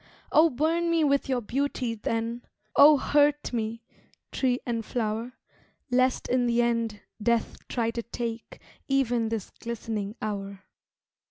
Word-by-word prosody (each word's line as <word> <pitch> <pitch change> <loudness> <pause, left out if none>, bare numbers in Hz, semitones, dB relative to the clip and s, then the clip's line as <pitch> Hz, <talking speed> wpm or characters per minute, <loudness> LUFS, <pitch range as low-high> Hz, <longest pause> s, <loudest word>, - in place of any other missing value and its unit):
Oh 320 +2 +6
burn 320 +5 +1
me 335 -1 +3
with 280 -2 +2
your 255 -2 +1
beauty, 255 0 -1
then, 230 +2 -2 0.3
Oh 295 +1 +8
hurt 290 0 +2
me, 225 0 -3 0.5
tree 255 -2 +1
and 230 -2 -2
flower, 225 +1 -2 0.6
Lest 255 +1 +2
in 250 -1 +2
the 235 0 +2
end 230 -3 -1 0.2
death 235 +1 +1
try 230 -2 -1
to 235 - -3
take 235 0 -6 0.3
Even 245 -5 +1
this 220 -4 -4
glistening 220 -3 -4
hour. 200 -2 -5
235 Hz, 135 wpm, -27 LUFS, 225-270 Hz, 0.6 s, Oh